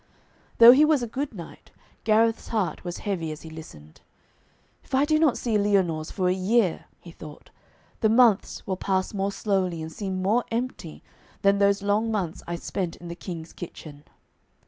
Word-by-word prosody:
Though 235 +1 +10
he 275 +4 +6
was 305 -4 +3
a - - -3
good 270 +5 -4
knight, 170 -3 -11 0.4
Gareth's 225 +1 +2
heart 215 -6 -2
was 175 -1 -5
heavy 175 -6 -2
as 155 - -9
he 160 - -10
listened. 80 - -12 0.8
'If - - -4
I 275 +2 +3
do 310 0 +2
not 310 -5 +3
see 225 -4 0
Lyonors 185 -6 +1
for 185 -2 -1
a 180 - +3
year,' 190 0 +1
he 170 - -13
thought, 150 -2 -13 0.5
'the 220 - +2
months 230 -3 +3
will 190 -1 -3
pass 190 +1 -1
more 200 0 -1
slowly 190 -5 -1
and 160 0 -6
seem 190 +1 -4
more 220 +6 +2
empty 230 -8 -5 0.4
than 200 0 +4
those 200 0 +2
long 210 +3 +1
months 185 -6 -3
I 175 - -3
spent 175 0 -4
in 175 - -11
the 170 - -6
King's 170 -3 -8
kitchen.' 150 -4 -10
195 Hz, 180 wpm, -25 LUFS, 170-225 Hz, 0.8 s, Though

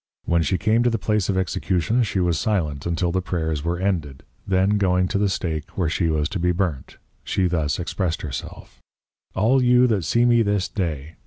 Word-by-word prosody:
When 85 -1 +2
she 80 +4 0
came 110 +6 +2
to 120 - +3
the 115 - 0
place 105 -2 0
of 95 - +1
Execution, 95 +4 0
she 105 -4 -1
was 85 -3 +1
silent 80 -9 -1
until 85 +1 0
the 95 +1 0
Prayers 80 -4 -2
were 85 +1 -1
ended, 85 -8 -2 0.2
then 95 +2 +2
going 90 -1 +2
to 100 - 0
the 100 -1 +2
Stake 80 -2 -4
where 90 -5 +1
she 85 +1 0
was 75 -2 0
to 95 - -4
be 90 +1 +2
Burnt, 85 -7 -3 0.3
she 95 - 0
thus 80 -5 0
expressed 90 -1 -2
herself, 65 -2 -7 0.6
_All 120 +7 +3
you 125 0 +5
that 110 -7 +1
see 120 +8 +2
me 120 -1 +4
this 100 -3 0
day! 80 -5 -4
90 Hz, 200 wpm, -23 LUFS, 80-100 Hz, 0.6 s, you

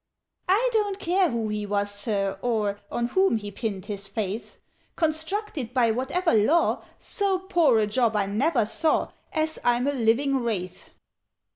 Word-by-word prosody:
"I 445 +7 +4
don't 410 -3 +1
care 365 -1 +2
who 230 -4 -2
he 210 -1 -3
was, 205 0 -1
Sir, 205 -1 -1
or 210 -4 0
On 240 0 -1
whom 380 -3 +3
he 205 -1 -6
pinned 200 -3 -4
his 200 -1 -5
faith! 205 +1 -4 0.4
Constructed 315 - -2
by 235 -3 +4
whatever 280 - 0
law, 230 +11 +3
So 400 -3 0
poor 345 -9 +3
a 215 - +3
job 225 +1 +1
I 205 -1 +2
never 235 +5 +1
saw, 315 +8 0 0.2
As 315 0 -1
I'm 245 +1 +2
a 285 - +1
living 265 +3 +2
Wraith! 210 -8 -4
240 Hz, 155 wpm, -25 LUFS, 210-320 Hz, 0.4 s, I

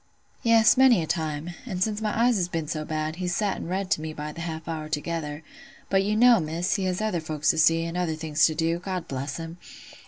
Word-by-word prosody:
"Yes, 230 +1 +5
many 255 -9 +6
a - - -3
time; 160 0 -2
and 185 -7 -2
since 215 0 -2
my 220 +1 0
eyes 245 -1 +4
has 180 -2 0
been 165 -3 -3
so 155 0 -3
bad, 155 +1 -3
he's 180 -1 -2
sat 205 -3 0
an' - - -6
read 185 +1 -3
to 155 - +2
me 155 0 -5
by 150 0 -5
the 165 - -8
half 165 -1 -5
hour 155 -2 -4
together: 155 -1 -3 0.5
but 195 0 +4
you 210 +2 0
know, 240 0 +6
Miss, 165 +2 -1
he 195 - -1
has 185 +2 -1
other 215 -6 -1
folks 155 -1 +1
to 160 - -2
see, 165 +1 +4
and 165 +1 -4
other 175 -3 -1
things 155 -1 +2
to 155 - -3
do—God 170 +3 -2
bless 135 +1 -4
him! 165 +1 -8
165 Hz, 240 wpm, -26 LUFS, 155-190 Hz, 0.5 s, many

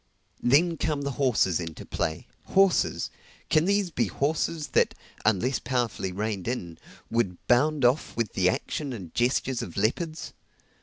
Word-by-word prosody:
Then 160 +7 +4
come 150 -3 -1
the 140 - -1
horses 120 - +2
into 80 -2 -6
play, 80 +2 -2 0.2
horses! 195 -2 +2 0.4
can 155 +1 +4
these 200 -2 +1
be - - +1
horses 155 +1 -1
that - - +2 0.3
(unless 110 +5 +2
powerfully 120 -7 -1
reined 100 0 -3
in) 90 -10 -4 0.3
would 110 -6 0
bound 140 +2 +3
off 125 +1 +1
with 115 -4 -1
the 90 -1 +3
action 140 +8 -3
and 95 -8 -8
gestures 125 +1 +1
of 85 - -7
leopards? 155 - -1
125 Hz, 145 wpm, -27 LUFS, 100-155 Hz, 0.4 s, Then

